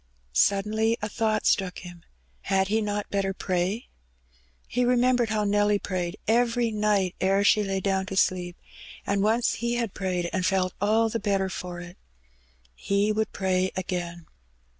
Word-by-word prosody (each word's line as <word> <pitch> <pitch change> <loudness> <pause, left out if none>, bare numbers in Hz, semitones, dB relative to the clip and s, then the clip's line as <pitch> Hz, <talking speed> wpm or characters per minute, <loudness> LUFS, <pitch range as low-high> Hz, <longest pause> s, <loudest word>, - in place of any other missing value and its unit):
Suddenly 215 - +2
a - - 0
thought 215 0 -1
struck 185 -2 +1
him. 175 -1 -11 0.4
Had 190 0 +1
he 220 +2 +2
not 205 -1 -3
better 195 -1 -1
pray? 185 +6 -1 0.8
He 245 - 0
remembered 245 -1 +3
how 215 -1 0
Nelly 205 0 +2
prayed 185 -1 -3
every 235 +1 +2
night 210 -3 +1
ere 195 +1 +3
aha 210 +1 +4
lay 195 -1 -1
down 190 0 0
to 195 - -5
sleepj 180 -2 +1 0.5
and 200 0 0
once 225 +4 +2
he 235 0 0
had 235 -4 -2
prayed 180 -2 -2
and 185 -2 0
felt 185 -1 +1
all 220 +2 +3
the 230 - -2
better 195 -2 0
for 180 -1 -6
it. 175 +1 -11 0.7
He 200 - 0
would 215 0 -1
pray 185 -1 0
again. 175 -2 -4
200 Hz, 160 wpm, -26 LUFS, 185-220 Hz, 0.8 s, aha